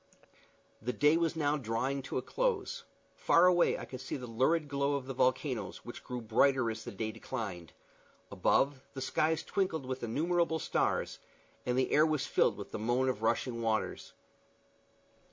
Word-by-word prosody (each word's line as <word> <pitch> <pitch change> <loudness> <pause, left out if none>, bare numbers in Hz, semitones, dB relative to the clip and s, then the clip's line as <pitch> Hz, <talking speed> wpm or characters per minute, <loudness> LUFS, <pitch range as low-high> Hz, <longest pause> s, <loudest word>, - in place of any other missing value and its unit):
The 125 +3 -2
day 150 +4 +4
was 165 0 +1
now 150 -1 +1
drawing 130 +2 -2
to 130 - -4
a 130 - -2
close; 485 0 -1 0.3
far 170 +2 +4
away 180 -1 +4
I - - -6
could 130 -1 -8
see 130 - -4
the 125 - -7
lurid 135 +7 +1
glow 140 0 0
of 140 -2 -3
the 135 - -5
volcanoes, 130 -4 -1
which 120 - -8
grew 125 -1 -5
brighter 120 +2 +3
as 110 0 -7
the - - -6
day 110 +2 -3
declined: 100 -10 -6 0.6
above, 135 -1 +2
the 135 - -4
skies 155 +4 +1
twinkled 175 -8 -1
with 130 0 -4
innumerable 160 +7 +1
stars, - - -1 0.5
and 125 0 +1
the 130 - +1
air 155 +2 +5
was 155 -3 0
filled - - +2
with - - -8
the - - -4
moan 120 +4 +1
of 110 -5 -2
rushing 115 +1 0
waters. 110 -2 -2
130 Hz, 170 wpm, -32 LUFS, 120-155 Hz, 0.6 s, air